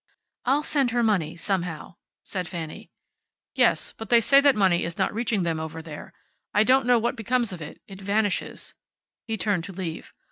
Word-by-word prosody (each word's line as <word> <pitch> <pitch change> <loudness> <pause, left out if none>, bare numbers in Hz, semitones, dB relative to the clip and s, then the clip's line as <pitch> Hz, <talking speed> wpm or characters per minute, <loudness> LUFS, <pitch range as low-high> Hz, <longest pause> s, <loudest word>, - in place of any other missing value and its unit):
"I'll 275 +4 +2
send 280 -5 +2
her 240 0 +1
money, 180 -8 +1
somehow," 175 -2 -3 0.3
said 185 -3 -4
Fanny. 160 -3 -7 0.6
"Yes. - - +2
But 225 - -8
they 235 - +6
say 275 +5 +6
that 280 -1 +5
money 190 -4 +3
is 170 0 -4
not - - 0
reaching 220 -3 0
them 165 -2 -1
over 160 0 -5
there. 160 -2 -9 0.4
I 210 - +6
don't 260 +2 +3
know 245 -1 +6
what 235 +1 0
becomes 235 -1 0
of 175 - -8
it. 150 - -8
It 195 -1 -11
vanishes." 205 +1 -1 0.5
He 225 -1 -2
turned 200 -5 0
to - - -7
leave. 175 -3 -6
200 Hz, 185 wpm, -25 LUFS, 170-235 Hz, 0.6 s, they